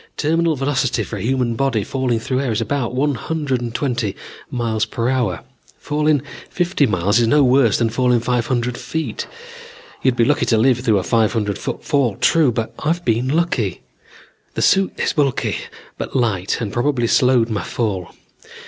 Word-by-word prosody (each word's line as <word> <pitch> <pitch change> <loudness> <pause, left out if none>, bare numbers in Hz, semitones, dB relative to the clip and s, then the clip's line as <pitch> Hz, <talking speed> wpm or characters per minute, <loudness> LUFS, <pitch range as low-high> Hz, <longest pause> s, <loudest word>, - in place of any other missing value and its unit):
Terminal 165 +1 +1
velocity 135 -2 0
for 105 - -6
a - - -6
human 125 +1 0
body 115 -3 0
falling 130 -1 -1
through 130 +3 -1
air 135 -4 -1
is 110 - 0
about 120 +1 -2
one 145 +2 +1
hundred 145 -1 -2 0.2
twenty 120 -8 -1 0.4
m.p.h. 115 -3 -1 0.9
Falling 150 -1 0 0.3
fifty 175 -5 +1
miles 100 +2 +2
is 115 - +3
no 145 +4 +4
worse 125 -4 +4
than 115 -2 0
falling 125 0 +2
five 120 0 -1
hundred 120 -1 -1
feet. 160 -9 -4 0.7
You'd 130 -2 +2
be 115 - +3
lucky 145 +3 +1
to 115 - +3
live 125 +2 +3
through 115 -4 +2
a 95 - 0
five 110 -2 +2
hundred 105 -4 -1
foot - - -5
fall, 130 -7 +1
true, 155 +1 +3
but 115 -1 -3
I've 170 +3 -1
been 120 +2 +1
lucky. 135 - 0 0.7
The - - 0
suit 195 0 +2
is - - 0
bulky 140 -4 0 0.4
but - - -5
light 105 -7 0
and 105 -4 -4
probably 120 -1 +1
slowed 125 -1 +3
my 105 -3 -1
fall. 100 -7 -2
125 Hz, 170 wpm, -19 LUFS, 115-140 Hz, 0.9 s, no